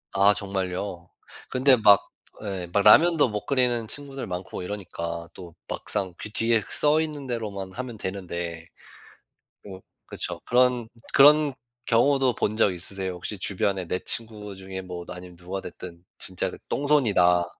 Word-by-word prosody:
아 100 +1 +6
정말요? 95 -2 -4 0.4
근데 130 +1 +5
막 105 -4 +5 0.3
예. 95 -4 -4
막 100 - +3
라면도 160 +6 +6
못 105 -1 -4
끓이는 125 -4 +1
친구들 140 +2 -6
많고 90 0 -5
이러니까 85 -4 -5
또 85 -3 -11
막상 95 -2 -3
그 - - -6
뒤에 115 +1 +2
써 150 +8 +2
있는 150 -3 -4
대로만 105 -6 -4
하면 125 -1 -6
되는데 85 -4 -5 1.0
뭐 95 -2 -9 0.3
그쵸. - - -5
그런 125 -1 +3 0.3
그런 145 0 +7 0.3
경우도 130 +1 +3
본 105 +1 -1
적 100 - +3
있으세요? 95 +1 -4
혹시 90 +4 -5
주변에 95 -1 0
내 90 +2 -1
친구 105 -3 -3
중에 95 0 -6
뭐 90 -1 -7
아니면 90 -1 -9
누가 90 +2 -5
됐든 85 -2 -10
진짜 95 -1 -3
그 - - -9
'똥손이다.' 105 -12 +3
100 Hz, 285 characters per minute, -25 LUFS, 90-125 Hz, 1.0 s, 그런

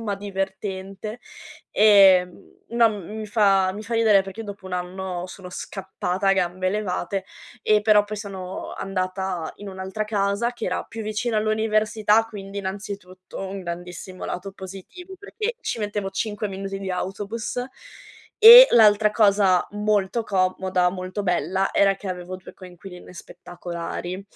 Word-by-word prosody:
ma 205 -2 -2
divertente. 195 +2 -5 0.5
Ehm, 195 -4 +4
no, 235 -1 +4
mhmm, 210 0 -7
mi 215 - -5
fa 195 -3 +3
mi 210 - -7
fa 230 +3 -8
ridere 220 -4 +4
perché 195 +4 -8
dopo 200 -2 -9
un 185 - -8
anno 180 0 -4
sono 180 0 -10
scappata 190 0 -3
a - - +6
gambe 185 0 0
levate 195 -2 -2 0.4
e 210 -1 +3
però 210 -1 +5
poi 215 +1 -6
sono 190 -3 -7
andata 185 -3 -3
in 205 -1 -9
un'altra 190 +3 -4
casa 210 +3 0
che 230 - -6
era - - -1
più 225 -1 -8
vicina 215 +2 -2
all'università, 215 0 +2
quindi 200 -3 -9
innanzitutto 190 -1 -7
un 195 0 -6
grandissimo 175 +1 -7
lato 195 +2 -5
positivo 195 - -10
perché 450 +3 -4
ci - - -3
mettevo 205 -2 -3
5 210 +1 -3
minuti 195 0 -5
di 195 -1 -5
autobus 205 +6 -4 0.8
e 480 +3 +12
l'altra 210 -2 +6
cosa 200 -4 +3
molto 210 +1 0
comoda, 185 -2 +1
molto 185 +2 -5
bella 190 +1 0
era 195 -1 +4
che 195 0 -8
avevo 180 0 -5
2 185 - -13
coinquiline 180 0 -12
spettacolari 175 +1 -7
195 Hz, 145 wpm, -23 LUFS, 185-215 Hz, 0.8 s, e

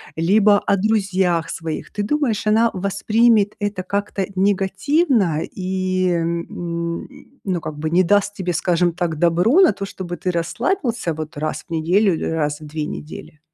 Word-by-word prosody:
либо 205 +5 +4
о 200 - +1
друзьях 190 -5 +1
своих. 160 -1 -5
Ты 205 - -3
думаешь, 225 -3 0
она 225 +2 +4
воспримет 205 +3 +2
это 205 -3 -2
как-то 200 0 -2
негативно 195 - +1
и, 185 0 -2
м, 170 0 -3 0.4
ну, 185 -3 -1
как 155 -2 -7
бы, 155 +1 -2
не 175 +3 +4
даст 205 +3 +2
тебе, 180 -3 -3
скажем 175 0 +1
так, 170 -3 -2
добро 175 - +3
на 375 -4 +6
то, 200 - -5
чтобы 185 -2 -6
ты 180 +2 -2
расслабился 230 - -1
вот 155 0 -7
раз 155 +1 -3
в - - -41
неделю 180 +5 +2
или 160 - -3
раз 150 -2 -1
в - - -9
2 150 0 -4
недели? 150 0 -8
185 Hz, 160 wpm, -20 LUFS, 170-205 Hz, 0.4 s, на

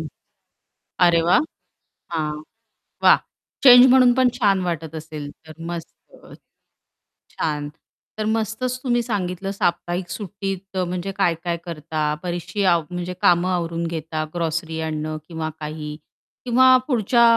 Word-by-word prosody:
हं. - - -5 1.0
अरे 170 -1 +4
वाह! 175 - +4 0.7
हां. 150 -2 -2 0.6
वाह! - - +8 0.5
चेंज 250 -1 +10
म्हणून 255 -1 +6
पण 255 0 +4
छान 195 -3 +3
वाटत 165 -2 -4
असेल, 155 -2 -7 0.2
तर 155 - -11 0.2
मस्त. 170 -2 -5 0.4
अ, - - -15 1.0
छान! 150 -2 -2 0.5
तर 215 - -2
मस्तच 225 +3 -1
तुम्ही 240 -2 +1
सांगितलं 195 -3 -3
साप्ताहिक 175 -2 -1
सुट्टीत 195 +1 -5
अ, 185 - +2
म्हणजे 180 +2 -3
काय-काय 170 -2 0
करता? 155 -1 -4 0.2
बरीचशी 175 +2 -3
आव 170 -3 +3
म्हणजे 180 0 -4
कामं 175 +1 +4
आवरून 170 -1 -2
घेता, 160 -1 -3
ग्रॉसरी 165 -1 -2
आणणं 155 0 -3
किंवा 160 -2 -4
काही. 150 0 -6 0.5
किंवा 250 +1 +4 0.2
पुढच्या 235 -2 +3
175 Hz, 130 wpm, -22 LUFS, 160-200 Hz, 1.0 s, चेंज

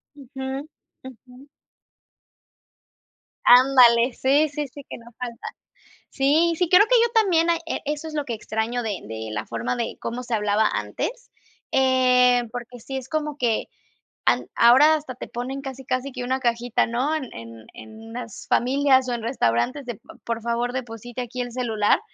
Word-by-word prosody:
Ujú, 270 +1 -6 0.4
ujú. 260 +2 -14 2.0
Ándale, 245 -1 +6
sí, 285 +5 +2
sí, 295 0 -4
sí, 285 +3 -11
que - - -7
no 235 - -17
falta, 245 -1 -6 0.6
sí, 300 +5 +2
sí, 355 -1 0
creo 385 +4 +6
que - - +4
yo 470 - +3
también, 355 -7 +3
hay 335 - +2
e - - -3
eso 300 +2 -3
es 310 - -9
lo 295 -2 -1
que 235 - -4
extraño 220 +3 -3
de 210 -5 -3
de 110 0 -6
la 105 +1 -4
forma 115 +2 -3
de 235 - -3
cómo 245 +2 -4
se 240 -2 -4
hablaba 210 0 +2
antes, 430 - -4 0.4
eh, 250 -2 +4
porque 245 0 -7
sí 270 +4 -6
es 260 - -9
como 300 -2 -2
que 235 -3 0 0.6
an - - +2
ahora 265 +7 +6
hasta 295 -5 -6
te - - -8
ponen 260 +3 -5
casi 265 -1 -8
casi 255 +2 -2
que 250 -1 -6
una 260 +2 -1
cajita, 240 -1 0
¿no?, 250 +6 -1
en 310 -4 -2
en 115 -1 -11
en 220 +1 -12
unas 230 -2 -8
familias 265 +1 +3
o - - -1
en 235 - -3
restaurantes 235 - 0
de: 240 - -5
"P - - -23 0.2
por 230 -1 -3
favor, 235 +1 -1
deposite 245 -1 -6
aquí 250 +1 -5
el 245 - -5
celular", 225 -4 +1
250 Hz, 175 wpm, -23 LUFS, 230-275 Hz, 2.0 s, Ándale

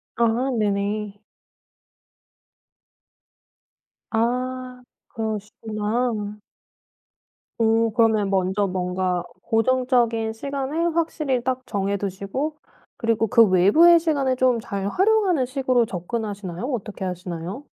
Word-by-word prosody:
아 235 0 +3 0.3
네네. 205 0 -2 2.9
아 250 +2 -2 0.3
그러시구나. 215 0 -3 1.2
오. 225 0 +3
그러면 220 -3 +3
먼저 190 +1 +1
뭔가 180 -1 -1 0.2
고정적인 235 -1 +1
시간을 280 +7 -2
확실히 300 -6 0
딱 255 0 -1
정해 200 0 -1
두시고 200 +10 -3 0.4
그리고 230 -1 +1
그 230 0 +6
외부의 210 - +6
시간을 285 -6 +1
좀 255 -2 +3
잘 200 -4 -4
활용하는 380 - +2
식으로 255 -2 +1
접근하시나요? 195 -2 -5
어떻게 210 -4 -4
하시나요? 180 - -5
225 Hz, 220 characters per minute, -23 LUFS, 200-255 Hz, 2.9 s, 그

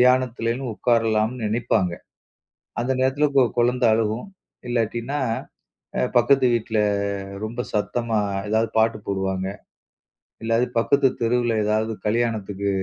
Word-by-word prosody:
தியானத்துலனு 125 0 +2
உக்காரலாம்னு 115 0 +1
நெனைப்பாங்க. 105 -4 +1 0.9
அந்த 125 +2 0
நேரத்துல 135 +3 +2
ஒரு - - -12
கொ 130 - +7 0.2
கொழந்தை 120 0 +3
அழுகும். 110 - -1 0.4
இல்லாட்டின்னா, 120 +4 -1 0.8
அ - - +1 0.2
பக்கத்து 130 +2 +4
வீட்டில 110 -1 -1 0.7
ரொம்ப 115 +3 -4
சத்தமா 110 +2 0 0.3
ஏதாவது 110 +1 +1
பாட்டு 110 -1 +3
போடுவாங்க. 95 -1 -1 1.0
இல்லாட்டி 115 +2 +2
பக்கத்து 140 +3 +3
தெருவுல 120 0 +1
ஏதாவது 110 +1 +1 0.2
கல்யாணத்துக்கு 105 -3 -1
115 Hz, 110 wpm, -23 LUFS, 110-125 Hz, 1.0 s, கொ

